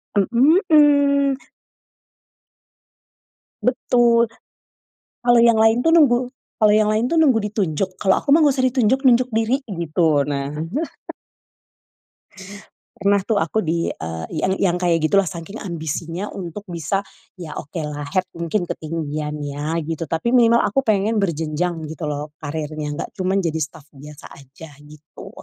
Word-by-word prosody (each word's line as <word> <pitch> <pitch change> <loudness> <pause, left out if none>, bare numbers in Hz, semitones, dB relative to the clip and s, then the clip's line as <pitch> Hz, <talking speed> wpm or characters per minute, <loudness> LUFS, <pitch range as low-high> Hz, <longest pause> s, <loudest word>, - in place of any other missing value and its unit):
Mhm. 280 - +4 2.3
Betul. 235 -1 +3 1.0
Kalau 240 -1 +5
yang 230 -1 +4
lain 225 +2 +4
tuh 325 - +3
nunggu 290 -8 +5 0.4
kalau 215 -2 +4
yang 215 0 +3
lain 220 +3 0
tuh 335 - +3
nunggu 255 -9 +3
ditunjuk 185 -2 -2
kalau 190 -1 +3
aku 280 - -2
mah 310 - +7
nggak 290 -4 +3
usah 260 - 0
ditunjuk 260 +2 +1
nunjuk 255 -1 +4
diri 225 +4 +1
gitu 165 -5 +1
nah. 140 -1 -3 2.5
Pernah 200 0 +2
tuh 210 +1 -1
aku 170 +6 0
di, 165 -1 -1
eee, 80 0 -6 0.2
yang 190 - +1
yang 180 -2 +1
kayak 175 -2 +2
gitulah 195 +2 +2
saking 175 +5 -8
ambisinya 170 +1 -5
untuk 190 +2 -7
bisa, 175 +3 -3 0.3
ya 170 -4 -8
okelah 150 -2 -6
head 185 +4 0
mungkin 170 +3 -2
ketinggian 155 -2 -4
ya 145 +3 -3
gitu 165 -1 -5
tapi 235 +10 -1
minimal 235 -1 +4
aku 270 +7 +1
pengen 215 -2 +1
berjenjang 165 0 -2
gitu 155 0 -5
loh 150 +1 -5
karirnya 150 0 -4
nggak - - -5
cuman 190 +1 -1
jadi 165 -4 -1
staff 155 0 -6
biasa 145 +1 -12
aja 140 +4 -14 0.2
gitu 150 0 -13
185 Hz, 135 wpm, -20 LUFS, 155-235 Hz, 2.5 s, mah